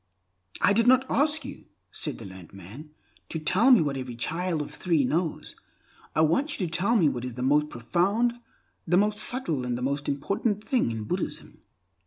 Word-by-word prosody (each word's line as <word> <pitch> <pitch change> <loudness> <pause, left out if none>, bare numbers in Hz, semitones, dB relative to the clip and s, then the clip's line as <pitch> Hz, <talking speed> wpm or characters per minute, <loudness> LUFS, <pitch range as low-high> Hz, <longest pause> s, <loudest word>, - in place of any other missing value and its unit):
"I 205 - +4
did 230 +3 +2
not 260 +1 +5
ask 305 +2 +2
you," - - -9 0.3
said - - -3
the 115 - -10
learned 95 -3 -12
man, 105 - -11 0.4
"to - - -3
tell 185 - +3
me 245 -7 +7
what 145 -3 -1
every 130 -2 -6
child 165 +5 -2
of - - -10
three 165 -6 +1
knows. 165 +4 -2 0.6
I - - +3
want 270 - +1
you 185 - 0
to 165 - -6
tell 200 +7 +2
me 180 -9 +4
what 125 -4 -2
is 125 -2 -6
the 125 - -4
most 150 +3 +2
profound, 190 - 0 0.5
the 175 +2 +3
most 210 +1 +2
subtle, 170 - 0
and 125 -1 -2
the 125 - -5
most 140 +2 -2
important 200 - -2
thing 255 - +1
in 110 -1 -4
Buddhism." 105 - -5
160 Hz, 195 wpm, -26 LUFS, 130-210 Hz, 0.6 s, me